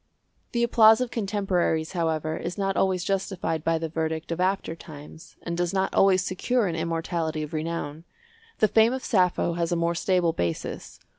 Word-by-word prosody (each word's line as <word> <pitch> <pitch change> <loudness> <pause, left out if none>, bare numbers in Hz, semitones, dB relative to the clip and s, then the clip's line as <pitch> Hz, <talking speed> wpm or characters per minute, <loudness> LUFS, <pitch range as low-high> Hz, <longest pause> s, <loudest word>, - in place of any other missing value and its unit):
The 235 -1 +1
applause 225 -2 +6
of 250 -1 -2
contemporaries, 195 -7 0
however, 160 -3 -1
is 175 +4 -5
not 195 -1 -1
always 185 -2 +1
justified 190 -5 -2
by 165 0 +1
the 165 0 -3
verdict 160 0 -3
of 165 - -3
after 185 -3 0
times, 155 0 -12
and 170 - -3
does 175 +2 -1
not 190 0 0
always 190 -1 +4
secure 225 +6 0
an 170 -4 -2
immortality 165 -1 -2
of 150 +2 -8
renown. 160 0 -4 0.5
The 215 - +4
fame 225 +3 +4
of 260 - -4
Sappho 180 -4 +2
has 170 0 -1
a - - +2
more 170 0 +1
stable 175 -1 +1
basis. 85 - -4
170 Hz, 175 wpm, -26 LUFS, 160-195 Hz, 0.5 s, applause